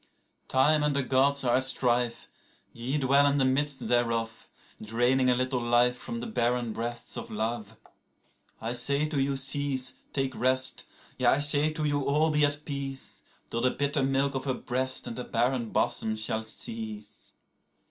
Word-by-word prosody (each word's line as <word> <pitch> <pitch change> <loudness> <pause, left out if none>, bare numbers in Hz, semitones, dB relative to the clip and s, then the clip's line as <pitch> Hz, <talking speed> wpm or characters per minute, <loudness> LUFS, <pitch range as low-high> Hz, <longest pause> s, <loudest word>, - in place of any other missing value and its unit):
19Time 150 +3 +3
and 150 -1 +1
the 140 - +1
Gods 140 +2 +2
are 120 -1 +3
at 130 - +2
strife; 125 -2 0 0.5
ye 125 +5 -2
dwell 140 +1 +4
in 140 0 +2
the 135 - +3
midst 140 +2 0
thereof,20Draining 120 +1 -1
a 125 - +4
little 130 0 0
life 120 +1 +3
from 235 - -6
the 235 0 -4
barren 120 - -1
breasts 120 +1 -4
of - - -6
love.21I 110 +1 -7
say 140 +4 +1
to 150 -3 -1
you, 135 0 0
cease, 135 -1 0 0.2
take 135 -1 -1
rest; 130 +1 +1 0.3
yea, - - +2
I - - +5
say 145 +1 +2
to 155 0 -2
you 145 -1 0
all, 150 +3 +2
be 150 0 +3
at 145 +1 0
peace,22Till 135 -4 -6
the 130 - +3
bitter 140 +2 0
milk 135 +1 +1
of 135 0 -3
her 130 -2 0
breast 130 +1 -2
and 115 - -5
the 125 - -4
barren 120 0 0
bosom 110 0 0
shall 110 0 +2
cease. 110 -1 -7
130 Hz, 165 wpm, -28 LUFS, 120-140 Hz, 0.5 s, I